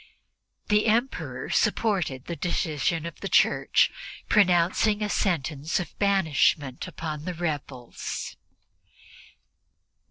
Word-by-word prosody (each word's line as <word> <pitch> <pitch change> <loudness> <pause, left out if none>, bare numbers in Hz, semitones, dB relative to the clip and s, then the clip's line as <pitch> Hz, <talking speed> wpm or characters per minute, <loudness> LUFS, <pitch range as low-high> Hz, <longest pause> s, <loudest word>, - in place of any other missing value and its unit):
The 210 +1 +3
Emperor 235 +5 -1
supported 180 - 0
the 170 - -4
decision 165 -1 -1
of 170 - -7
the - - -5
Church, - - +3 0.4
pronouncing 200 +2 +3
a 210 - -1
sentence 160 -6 -1
of 175 -4 -6
banishment 160 -8 +1
on 155 -1 -4
the 180 - -4
rebels. 145 -7 -5
170 Hz, 95 wpm, -26 LUFS, 150-200 Hz, 0.4 s, The